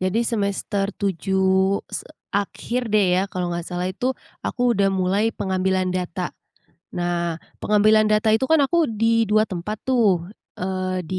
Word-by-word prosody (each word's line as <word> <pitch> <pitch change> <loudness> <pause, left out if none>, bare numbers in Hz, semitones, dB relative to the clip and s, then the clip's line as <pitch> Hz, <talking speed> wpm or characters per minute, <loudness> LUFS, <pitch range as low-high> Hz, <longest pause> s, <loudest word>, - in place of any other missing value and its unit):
Jadi 185 +4 0
semester 200 -2 -1
7 190 -1 -1 0.5
se - - -5 0.2
akhir 230 +4 -2
deh 210 -2 +5 0.2
ya, - - +1
kalau 180 -2 -3
nggak 170 0 -4
salah 180 0 -3
itu, 245 - -3 0.3
aku 245 0 +1
udah 200 -2 +2
mulai 195 +4 +2
pengambilan 185 -1 0
data. 180 0 -3 0.7
Nah, 170 -1 -1 0.2
pengambilan 215 +1 +4
data 215 +1 +3
itu 225 - +1
kan 320 - +6
aku 335 +1 +2
di 225 0 +2
2 215 0 +4
tempat 195 +3 -4
tuh, 210 -10 +2 0.3
eee, 185 -1 -2
di 185 - -1
195 Hz, 150 wpm, -22 LUFS, 185-215 Hz, 0.7 s, kan